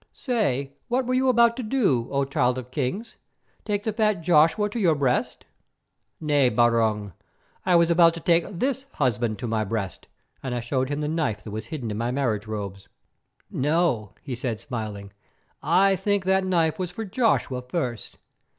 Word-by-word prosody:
Say, 140 - -1 0.2
what 250 +1 0
were 255 - -1
you 260 +1 +3
about 235 -1 +4
to - - -2
do, 210 - +1
O 140 0 0
Child 125 -2 +1
of 125 -1 -7
Kings? 145 - -3 0.5
Take 205 -1 -1
the 220 - -1
fat 215 -5 +1
Joshua 165 +5 +4
to 210 +3 -4
your 170 -7 +3
breast?" 135 -4 -1 0.7
"Nay, 145 -4 +3
Barung, 115 -5 +1 0.5
I 180 - +5
was 170 0 +4
about 170 -1 +5
to - - -6
take 165 +1 +2
this 265 +8 -2
husband 120 -5 0
to 120 - -4
my 110 -1 0
breast," 100 -2 -4 0.3
and 130 -2 -3
I - - -1
showed 130 +2 -1
him 145 +1 -2
the 150 - -1
knife 150 -10 -1
that 110 - -8
was 110 +2 -5
hidden 125 -7 -5
in 105 - -4
my 120 +1 -1
marriage 120 -5 -1
robe. 100 -3 -4 0.7
"No," 130 - 0
he 140 -3 -5
said, 120 -2 -3
smiling, 105 -7 -6 0.5
"I 185 +6 +4
think 200 0 0
the 190 0 +3
knife 170 -4 +1
was 180 -2 -2
for 220 +5 -6
Joshua 200 - +1
first. 125 - -4
145 Hz, 180 wpm, -25 LUFS, 120-190 Hz, 0.7 s, I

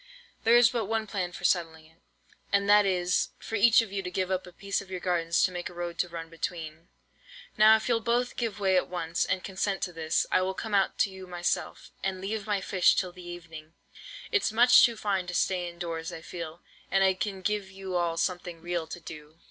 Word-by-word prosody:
There 230 +1 +7
is 240 -1 +6
but 235 -4 -1
one 220 +1 -1
plan 190 -4 -3
for - - -10
settling 165 -3 0
it, 160 +1 -24 0.5
and 200 0 +2
that 205 0 +6
is, 180 -1 +1
for - - -10
each 225 +2 +5
of 215 - -9
you 200 -1 -2
to 180 - -5
give 185 +1 -2
up 185 -1 -1
a - - -11
piece 200 +3 -3
of 195 - -13
your 185 -1 -4
gardens 170 -2 +1
to 185 - +2
make 175 -1 -5
a 175 - -14
road 175 -1 -5
to 180 - 0
run 165 -1 -6
between. 165 -1 -6 0.7
Now 215 +1 +7
if 220 - -2
you'll 235 -2 +2
both 240 +2 0
give 230 -4 -3
way 190 -2 +2
at - - 0
once, 175 -1 -1
and 185 0 -1
consent 195 0 -2
to 180 - -3
this, 160 -1 0
I - - +4
will 190 +1 -1
come 220 +1 -5
out 195 -1 +2
to 200 - +2
you 190 -1 -10
myself, 175 -1 -3
and 190 -1 -2
leave 205 +2 -4
my 205 -2 0
fish 185 -2 +3
till 185 -2 -1
the 180 0 -13
evening. 165 -2 -10 0.6
It's 410 - +2
much 240 +3 +7
too 235 -2 +3
fine 195 -4 -1
to 180 - -4
stay 180 -2 0
in 170 - -14
doors, 165 -2 -4
I 160 - -8
feel; 165 -1 -7 0.3
and 195 0 +3
I 190 0 +4
can 190 +1 -4
give 205 -1 -1
you 190 -1 -6
all 170 -1 0
something 175 -1 -2
real 170 -1 -3
to 175 - -7
do." 155 -1 -11
185 Hz, 235 wpm, -28 LUFS, 170-200 Hz, 0.7 s, There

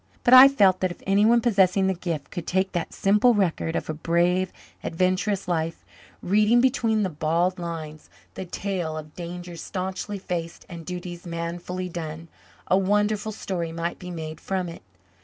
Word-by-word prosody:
But 245 - +4
I 255 +1 +12
felt 200 -9 +4
that 185 - +1
if 175 - -10
anyone 210 +4 +4
possessing 195 -4 +3
the 190 - +2
gift 170 -5 -5
could 175 - -6
take 190 +1 +1
that 175 -2 -3
simple 210 +5 +3
record 170 -4 0
of - - -2
a 155 - -2
brave, 175 +4 +1 0.3
adventurous 185 +3 0
life, 165 -2 -2 0.4
reading 210 +5 +4
between 235 -4 +2
the 190 - 0
bald 170 +4 0
lines 160 -3 -6 0.2
the 190 - -6
tale 175 -4 -3
of 155 -1 -9
dangers 175 -1 -7
staunchly 190 +2 -4
faced 170 -3 -5
and 170 -3 -9
duties 175 -1 -6
manfully 170 +2 -4
done, 165 -1 -6 0.4
a 185 - +3
wonderful 210 +2 +1
story 175 -5 -4
might 165 +1 -3
be 180 - -8
made 160 -2 -6
from 190 -2 -2
it. 170 - -10
180 Hz, 165 wpm, -25 LUFS, 170-195 Hz, 0.4 s, I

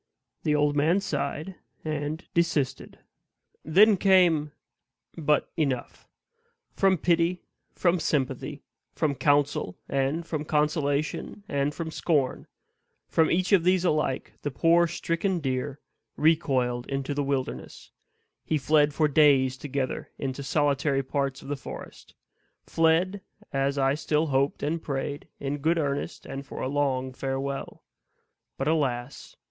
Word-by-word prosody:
The 150 - +1
old 145 0 +2
man 160 +6 +3
sighed, 155 +1 -3 0.3
and 155 +1 -3
desisted. 165 -6 0 0.7
Then 200 +6 +5
came 175 -6 +4 0.6
But 150 -2 +1
enough! 140 -7 -2 0.7
From 190 -1 +3
pity, 170 +2 +1 0.3
from 175 0 +2
sympathy, 140 -1 -2 0.3
from 155 -3 +1
counsel, 145 -8 +1
and 140 +5 0
from 155 -3 -3
consolation, 150 +4 -1
and 140 +1 -1
from 165 -2 -4
scorn 145 -6 0 0.6
from 160 -1 +3
each 185 +3 +1
of 190 -5 +5
these 185 0 +3
alike 150 -5 0
the 145 - -2
poor 170 +5 +4
stricken 175 +2 -1
deer 135 0 -2 0.4
"recoiled 130 -6 +2
into 135 +1 -2
the 145 - -1
wilderness;" 135 -2 -4 0.5
he 155 - 0
fled 150 +1 +3
for 155 - +3
days 140 -3 +4
together 135 -1 -3
into 135 0 -4
solitary 140 -1 +1
parts 135 0 -2
of - - -11
the 145 - -2
forest; 135 - -10 0.5
fled, 170 +5 +2 0.3
as 135 +1 0
I 135 0 +3
still 150 +1 0
hoped 140 -1 0
and 160 +3 -1
prayed, 140 0 -4
in 140 +1 -3
good 160 +4 +2
earnest 140 -3 -2
and 135 +1 -6
for - - -9
a - - -2
long 130 -2 0
farewell; 135 +1 -4 0.7
but, 135 - -2
alas! 135 -5 -1
145 Hz, 130 wpm, -27 LUFS, 135-165 Hz, 0.7 s, Then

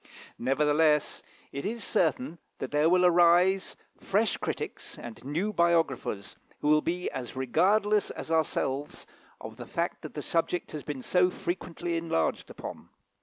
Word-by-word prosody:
Nevertheless, 150 +3 +2 0.3
it 140 - -5
is 225 +2 -3
certain 160 -2 0 0.2
that 130 - -5
there 150 +2 +3
will 180 +1 +4
yet 180 - +7
arise 175 +2 +4 0.2
fresh 205 +2 +1
critics - - -5
and 120 -2 -9
new 170 +10 -1
biographers, 165 - +1 0.3
who 150 - +1
will 150 0 +5
be 175 +3 -2
as 130 -2 -6
regardless 200 - +2
as - - -7
ourselves 145 -3 -1 0.3
of - - -9
the - - -8
fact - - -2
that - - -9
the - - -4
subject 170 +1 -1
has 150 - -5
been 140 -4 -6
so 180 0 +3
frequently 175 -1 -3
enlarged 165 - -1
upon. - - -8
165 Hz, 150 wpm, -29 LUFS, 145-180 Hz, 0.3 s, yet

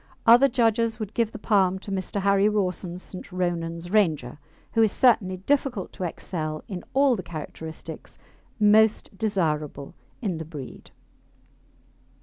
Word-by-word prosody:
Other 245 +4 +7
judges 230 -2 +1
would 215 -1 -5
give 230 -1 0
the - - -7
palm 190 -4 +2
to 195 +1 -8
Mr. 195 +1 -2
Harry 200 +1 +4
Rawson's 185 -3 -2
St. 185 - -9
Ronan's 175 -1 -3
Ranger, 155 - +1 0.3
who 225 - +3
is 220 -2 +4
certainly 200 -7 +3
difficult 250 0 -1
to 185 - -4
excel 155 -3 -4
in 185 -5 -6
all 275 -2 +4
the 195 - -4
characteristics 160 -1 -8 0.4
most 215 0 +4
desirable 155 -9 -2 0.3
in 190 -9 -2
the 160 - -5
breed. 150 -5 -9
190 Hz, 135 wpm, -25 LUFS, 170-220 Hz, 0.4 s, Other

